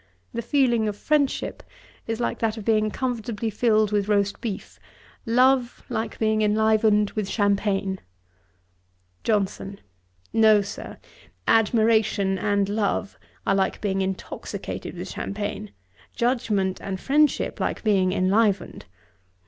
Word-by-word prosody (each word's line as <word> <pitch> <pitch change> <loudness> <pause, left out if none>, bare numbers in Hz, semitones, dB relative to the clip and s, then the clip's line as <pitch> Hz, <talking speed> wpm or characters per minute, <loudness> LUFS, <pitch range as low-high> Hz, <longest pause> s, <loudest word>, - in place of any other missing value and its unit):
The 235 - -2
feeling 240 -4 +2
of 210 - -2
friendship 295 0 0 0.5
is 225 0 -2
like 240 - -2
that 225 -1 0
of 215 - -7
being 215 -1 +2
comfortably 230 -2 -3
filled 215 -1 +2
with 205 -1 +1
roast 200 -1 +1
beef; 215 -5 -6 0.5
love, 250 +1 +3
like 225 -2 -3
being 220 -1 +1
enlivened 215 0 +3
with 210 -3 -3
champagne. 200 -2 0 1.2
JOHNSON. 200 -2 -1 0.5
'No, 215 -2 +5
Sir; 200 - -8 0.5
admiration 220 -3 +3
and 205 -2 +1
love 205 -1 -1 0.3
are - - +2
like 195 -1 0
being 195 -2 -1
intoxicated 190 0 -5
with - - -6
champagne; 205 - -4 0.5
judgement 215 -6 0
and 190 -1 -4
friendship 295 +5 +1
like - - -2
being 195 -4 +3
enlivened. 195 - +1
215 Hz, 115 wpm, -24 LUFS, 200-225 Hz, 1.2 s, No